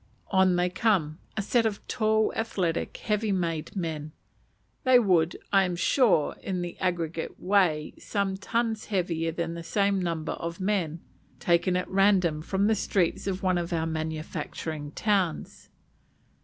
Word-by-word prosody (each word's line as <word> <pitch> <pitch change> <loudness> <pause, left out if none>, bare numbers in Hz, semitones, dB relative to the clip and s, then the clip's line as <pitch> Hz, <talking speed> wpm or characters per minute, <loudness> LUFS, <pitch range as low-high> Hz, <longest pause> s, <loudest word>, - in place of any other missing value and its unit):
On 190 -2 +4
they 175 0 +2
come, 180 -6 +1 0.2
a 215 - 0
set 235 +3 +2
of 215 -3 -3
tall, 220 -2 +1
athletic, 190 -7 -1
heavy 210 0 -1
made 170 -4 -2
men; 155 -4 -4 0.7
they 255 -1 +6
would, 180 -8 +3 0.2
I 195 -1 +6
am 180 -2 -1
sure, 180 - +3
in 185 -2 -2
the 175 - -5
aggregate 170 -2 -2
weigh 180 -6 +2
some 200 -2 -1
tons 225 +3 -1
heavier 170 -5 -1
than 165 0 -3
the 170 - -6
same 200 +3 +1
number 165 -3 -2
of 170 0 -5
men 185 -5 -1 0.4
taken 175 +1 +2
at 180 - -2
random 190 -5 +3
from 190 +5 0
the 220 - +4
streets 195 -3 0
of 190 -1 -2
one 185 -1 +2
of 170 -1 -4
our 165 -1 0
manufacturing 155 -1 -4
towns. 195 -6 -1
180 Hz, 150 wpm, -27 LUFS, 165-200 Hz, 0.7 s, they